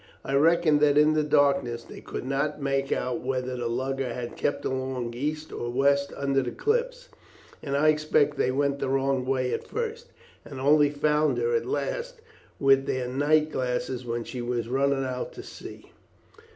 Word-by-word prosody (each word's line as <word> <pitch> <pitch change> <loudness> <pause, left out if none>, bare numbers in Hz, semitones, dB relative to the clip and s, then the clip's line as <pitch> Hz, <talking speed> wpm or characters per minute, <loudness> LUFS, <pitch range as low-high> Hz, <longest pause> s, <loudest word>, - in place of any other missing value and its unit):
I 135 - -3
reckon 160 +1 +4
that 145 -1 +4
in 150 +1 +5
the 155 - +2
darkness 140 -5 +2
they - - -11
could - - -6
not 140 +3 -1
make 135 -1 -1
out 125 -1 -1
whether 130 0 -2
the 120 -1 -3
lugger 130 +2 -2
had 120 0 -5
kept 145 - -2
along 130 -2 -3
east 150 +5 -4
or 120 - -4
west 140 +3 +2
under 140 -1 +1
the 125 - -3
cliffs, - - -1 0.5
and 140 -1 -2
I 155 +2 +4
expect 150 -1 +2
they 130 - +1
went 140 +1 0
the - - -2
wrong 135 -1 0
way 130 -1 0
at - - -4
first, 465 +1 -4 0.4
and 135 - -9
only 145 +2 +4
found 150 +1 +1
her 465 0 0
at 460 - -1
last - - -3 0.4
with 135 -1 +4
their 130 -1 -1
night 150 +4 +2
glasses 125 -1 -2
when 120 -1 -3
she 125 +1 -6
was 120 -1 -2
running 135 +2 +1
out 125 -1 -4
to - - -9
sea. - - -11
140 Hz, 180 wpm, -26 LUFS, 130-150 Hz, 0.5 s, in